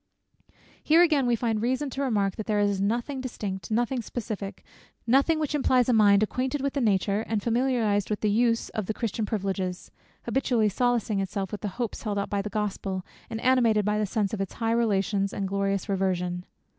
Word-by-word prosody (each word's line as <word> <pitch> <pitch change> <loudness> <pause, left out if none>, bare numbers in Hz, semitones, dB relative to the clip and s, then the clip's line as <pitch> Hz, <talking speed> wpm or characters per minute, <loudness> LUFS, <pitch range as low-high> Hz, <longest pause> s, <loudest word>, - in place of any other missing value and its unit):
Here 325 +3 +6
again 295 -7 +3
we 240 - +3
find 225 -2 -1
reason 260 +4 -1
to 275 - -4
remark, 205 -8 +1
that 215 - -5
there 210 -2 +1
is 200 -1 +1
nothing 240 +6 -1
distinct, 205 -7 -5
nothing 240 +3 0
specific, 210 -4 -6 0.4
nothing 275 +7 +3
which 305 -2 -2
implies 255 -4 +3
a - - +4
mind 205 -2 +5
acquainted 255 +6 -1
with 275 0 -1
the 280 - -1
nature, 200 -1 +2
and 215 -3 -1
familiarized 230 -4 +1
with 210 - -2
the 215 - +2
use 230 +1 +2
of 215 -4 -4
the 220 - -2
Christian's 220 -2 -2
privileges, 190 -3 -3 0.3
habitually 245 -5 +1
solacing 235 -1 0
itself 195 0 -3
with 210 - -5
the 210 - -2
hopes 240 -4 -3
held 205 -2 -2
out 200 - -2
by 200 -1 +1
the 210 - -5
Gospel, 195 -3 -3 0.2
and 225 - -4
animated 235 -5 +3
by 210 0 +1
the 210 - 0
sense 205 0 -1
of 205 - -2
its 195 - -4
high 225 -1 -1
relations, 200 -3 +1
and 200 - -3
its 190 - -2
glorious 200 0 -1
reversion. 180 -2 -1
215 Hz, 200 wpm, -27 LUFS, 200-245 Hz, 0.4 s, Here